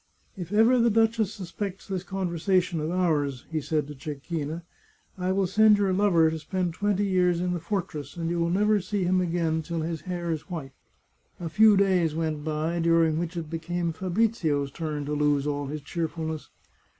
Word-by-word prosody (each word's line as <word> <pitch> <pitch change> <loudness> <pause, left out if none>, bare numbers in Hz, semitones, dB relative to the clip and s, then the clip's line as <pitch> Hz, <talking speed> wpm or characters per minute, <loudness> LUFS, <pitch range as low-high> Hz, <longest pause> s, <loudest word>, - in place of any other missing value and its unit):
" - - -39
If 180 -2 -7
ever 225 +4 +5
the 235 0 +4
duchess 225 -1 +2
suspects 195 0 -6
this 190 -2 -2
conversation 180 -1 0
of 155 +1 -2
ours," 150 -7 0
he 155 -1 -1
said 150 +1 -1
to 150 - -8
Cecchina, 150 +2 -5 0.3
" - - -38
I 180 +1 0
will 195 0 +2
send 210 +3 +5
your 195 -2 +1
lover 180 -5 +4
to 160 - -4
spend 180 +1 -2
twenty 205 +2 0
years 180 -3 +2
in 180 0 0
the 175 - -2
fortress, 170 -5 -4
and 165 -1 -2
you 170 +1 -1
will 170 0 +1
never 210 +3 +3
see 190 +1 -2
him 185 +1 +2
again 165 -2 0
till 165 +1 -3
his 160 0 -3
hair 175 -2 -3
is 160 +3 -4
white." 150 -7 -6 0.7
A 170 -2 -4
few 210 +5 +6
days 180 -5 +2
went 155 -2 -2
by, 155 +2 -1
during 165 -1 +3
which 175 +1 -4
it 165 -2 -4
became 170 +1 -2
Fabrizio's 175 - 0
turn 150 -1 -4
to 150 - -3
lose 145 -1 +2
all 145 -1 -2
his 150 +2 -5
cheerfulness. 160 0 -4
170 Hz, 195 wpm, -27 LUFS, 155-190 Hz, 0.7 s, few